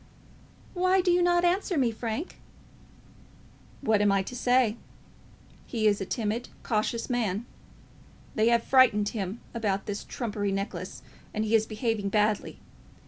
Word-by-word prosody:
"Why 370 +1 +3
do 360 -1 +3
you 355 +1 +3
not 350 0 +3
answer 360 0 +1
me, 250 -4 +2
Frank?" 230 +8 -5 1.4
"What 220 -6 +2
am 205 -1 +4
I 195 -1 +2
to 250 - -8
say? 245 -2 +2 0.9
He 225 -3 -2
is 205 -1 +3
a 195 - -3
timid, 225 +2 -2
cautious 230 +1 -1
man. 230 -4 -1 0.9
They 220 0 +2
have 235 -1 +3
frightened 230 -6 +4
him 205 0 -4
about 205 -4 -1
this 205 0 -4
trumpery 205 -4 -3
necklace, 195 +1 -4 0.3
and 215 +1 0
he 215 - -1
is 220 -1 +4
behaving 215 -2 -1
badly. 210 0 +1
225 Hz, 140 wpm, -28 LUFS, 210-250 Hz, 1.4 s, am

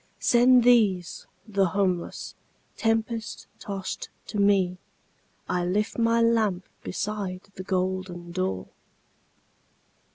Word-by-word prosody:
Send 245 +1 +5
these, 210 -8 +3 0.2
the 195 -3 +2
homeless, 185 -1 -1 0.4
tempest 225 0 -1
tost 195 -2 -5 0.2
to 210 - -4
me,I 185 -2 -1
lift 205 +6 -1
my 230 0 +3
lamp 220 -5 +2 0.2
beside 195 -1 -4
the 185 - -7
golden 185 -2 -2
door!" 95 - -2
195 Hz, 90 wpm, -26 LUFS, 185-225 Hz, 0.4 s, Send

